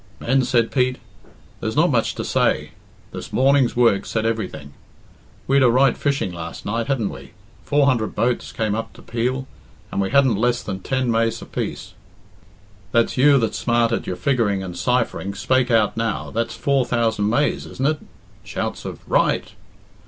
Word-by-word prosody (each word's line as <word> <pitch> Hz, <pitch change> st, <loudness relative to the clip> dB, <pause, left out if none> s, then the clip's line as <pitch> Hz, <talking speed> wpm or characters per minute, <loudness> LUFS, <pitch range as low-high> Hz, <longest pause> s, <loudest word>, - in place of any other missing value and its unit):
"Men," 135 Hz, +3 st, +2 dB
said 120 Hz, -2 st, +2 dB
Pete, 125 Hz, -1 st, +1 dB, 0.6 s
"there's -, -, -3 dB
not -, -, +4 dB
much -, -, +1 dB
to -, -, -4 dB
say. -, -, +1 dB, 0.4 s
This -, -, -8 dB
morning's 135 Hz, -1 st, +3 dB
work 115 Hz, -5 st, +3 dB
said 115 Hz, -1 st, -1 dB
everything. 105 Hz, -10 st, -3 dB, 0.7 s
We'd 135 Hz, +1 st, +3 dB
a 125 Hz, -, +6 dB
right 130 Hz, +1 st, +4 dB
fishing 140 Hz, -11 st, -1 dB
last 85 Hz, -1 st, -7 dB
night, 115 Hz, +3 st, -2 dB
hadn't 130 Hz, -7 st, 0 dB
we? -, -, -11 dB, 0.3 s
Four 145 Hz, 0 st, +2 dB
hundred 120 Hz, -6 st, +1 dB
boats 120 Hz, +1 st, 0 dB
came 110 Hz, -4 st, -1 dB
up 115 Hz, +1 st, -4 dB
to -, -, -15 dB
Peel, 125 Hz, +3 st, -2 dB, 0.5 s
and -, -, -1 dB
we 95 Hz, -, -1 dB
hadn't 135 Hz, -6 st, +4 dB
less 120 Hz, +2 st, +1 dB
than 95 Hz, -2 st, -4 dB
ten 130 Hz, +2 st, -1 dB
maise 115 Hz, 0 st, +1 dB
apiece. -, -, -5 dB, 1.0 s
That's 115 Hz, 0 st, +2 dB
you 140 Hz, +2 st, +5 dB
that's 115 Hz, -4 st, -1 dB
smart 120 Hz, -1 st, +2 dB
at 115 Hz, -, -2 dB
your 90 Hz, -, -2 dB
figguring 105 Hz, -3 st, 0 dB
and 90 Hz, -2 st, -6 dB
ciphering, 100 Hz, 0 st, -1 dB
spake 130 Hz, +5 st, +1 dB
out 110 Hz, -3 st, +3 dB
now 115 Hz, -2 st, -2 dB
that's 115 Hz, +1 st, -2 dB
four 140 Hz, -2 st, +1 dB
thousand 115 Hz, -4 st, 0 dB
maise 145 Hz, +6 st, 0 dB
isn't 130 Hz, -, -4 dB
it?" 155 Hz, +1 st, +1 dB, 0.4 s
(Shouts -, -, -4 dB
of -, -, -8 dB
"Right.") -, -, +1 dB
120 Hz, 170 wpm, -21 LUFS, 110-130 Hz, 1.0 s, a